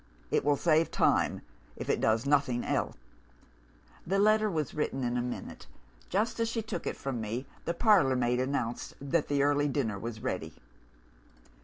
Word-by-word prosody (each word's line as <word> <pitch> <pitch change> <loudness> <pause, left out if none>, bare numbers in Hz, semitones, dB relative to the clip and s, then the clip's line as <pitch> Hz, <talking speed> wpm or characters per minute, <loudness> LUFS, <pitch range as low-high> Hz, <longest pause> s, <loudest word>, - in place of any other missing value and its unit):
It - - +2
will 145 +1 +3
save 160 +1 +3
time, - - +2 0.3
if - - -6
it - - +1
does 110 +2 +2
nothing 140 -4 +2
else.' - - -1 1.1
The 195 +3 +1
letter 215 +1 +4
was 155 -7 -2
written 135 -3 -2
in 120 0 -1
a 125 - +1
minute. 125 - -6 0.4
Just 215 +5 0
as 230 0 +1
she 230 -1 -2
took 205 -5 -5
it - - -3
from 130 -4 -3
me, 115 +5 -3 0.2
the 170 - -1
parlour 185 - +4
maid 125 0 +1
announced 130 -3 -2
that 140 +3 0
the 140 -1 +2
early 145 0 +3
dinner 120 -8 -1
was 115 +1 -5
ready. - - -3
140 Hz, 170 wpm, -30 LUFS, 125-170 Hz, 1.1 s, letter